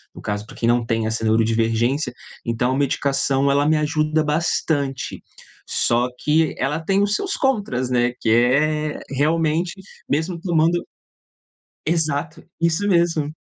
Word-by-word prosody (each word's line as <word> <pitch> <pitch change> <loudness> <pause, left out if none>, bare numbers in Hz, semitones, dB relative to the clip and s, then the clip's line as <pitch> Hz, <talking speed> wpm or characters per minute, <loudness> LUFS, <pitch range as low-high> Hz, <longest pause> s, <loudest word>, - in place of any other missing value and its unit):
no - - -10
caso 105 0 -3
pra - - -13
quem 115 - -1
não 120 0 +2
tem 115 -1 0
essa 110 +1 -2
neurodivergência. 115 +5 +1 0.3
Então 120 +2 0
a - - -1
medicação, 140 0 +1
ela 140 +1 +2
me 155 0 +3
ajuda 155 +1 +1
bastante, 150 -3 -1 0.5
só 120 +1 +2
que 155 +1 +2
ela 150 +3 -1
tem 195 +5 +1
os 205 0 0
seus 395 -1 -2
contras, 205 - 0
né? 120 -1 +1
Que 115 - 0
é, 150 +6 +2
realmente, 160 +4 +1 0.4
mesmo 160 +4 -1
tomando 170 -1 +2 1.1
Exato, 160 0 -1 0.2
isso 170 +4 +1
mesmo. 170 -5 +2
150 Hz, 140 wpm, -21 LUFS, 125-165 Hz, 1.1 s, me